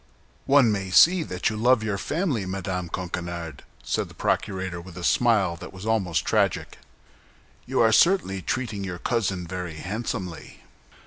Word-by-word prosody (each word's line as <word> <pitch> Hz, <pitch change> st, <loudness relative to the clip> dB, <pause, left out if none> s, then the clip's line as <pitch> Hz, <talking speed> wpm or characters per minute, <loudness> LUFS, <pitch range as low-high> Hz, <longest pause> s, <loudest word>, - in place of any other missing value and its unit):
"One 135 Hz, -5 st, +5 dB
may 100 Hz, -2 st, -2 dB
see 175 Hz, -, +6 dB
that 95 Hz, -, -2 dB
you -, -, -4 dB
love 120 Hz, +1 st, +3 dB
your 100 Hz, -2 st, -2 dB
family, 145 Hz, -, -1 dB
Madame 90 Hz, -2 st, -3 dB
Coquenard," 85 Hz, -3 st, -5 dB, 0.2 s
said -, -, -1 dB
the -, -, -15 dB
procurator, 95 Hz, -3 st, -2 dB
with 90 Hz, 0 st, -12 dB
a 90 Hz, -, -6 dB
smile 105 Hz, -5 st, +3 dB
that -, -, -9 dB
was 95 Hz, +2 st, -10 dB
almost 105 Hz, -7 st, 0 dB
tragic. -, -, 0 dB, 0.9 s
"You -, -, +1 dB
are 110 Hz, -1 st, +5 dB
certainly 110 Hz, -, +3 dB
treating 110 Hz, 0 st, -3 dB
your 90 Hz, -2 st, -4 dB
cousin 95 Hz, -4 st, -1 dB
very 90 Hz, -2 st, -5 dB
handsomely!" 90 Hz, -2 st, -5 dB
95 Hz, 150 wpm, -25 LUFS, 90-115 Hz, 0.9 s, see